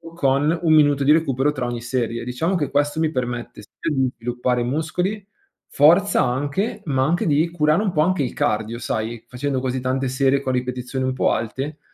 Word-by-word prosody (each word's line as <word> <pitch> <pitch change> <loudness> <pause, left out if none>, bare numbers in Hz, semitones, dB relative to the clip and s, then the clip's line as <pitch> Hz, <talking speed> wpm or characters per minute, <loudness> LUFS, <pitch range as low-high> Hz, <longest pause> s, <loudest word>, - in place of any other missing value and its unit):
con 145 +1 +2
1 165 -2 +3
minuto 145 -2 +4
di 140 - +4
recupero 145 -3 +1
tra 130 -4 -3
ogni 120 -1 -4
serie. 120 -1 -2
Diciamo 145 +10 -1
che 150 -5 -1
questo 145 +2 0
mi 160 -1 +1
permette 125 -3 -4
sia 125 - -5
di 135 -2 +1
sviluppare 125 +1 -1
muscoli, 170 - -2 0.4
forza 175 +8 +4
anche, 145 - -2
ma 135 -4 +1
anche 170 +5 0
di 155 +2 +2
curare 155 +1 +2
un 200 - 0
po' 150 - +1
anche 175 -1 +1
il 125 - -2
cardio, 110 +2 -1
sai, 115 0 -3
facendo 130 +2 -2
così 130 0 -2
tante 130 +1 -1
serie 135 +1 +2
con 130 -2 -2
ripetizioni 125 +1 -3
un 130 - 0
po' 130 - +1
alte, 135 +7 -3
135 Hz, 190 wpm, -22 LUFS, 125-155 Hz, 0.4 s, minuto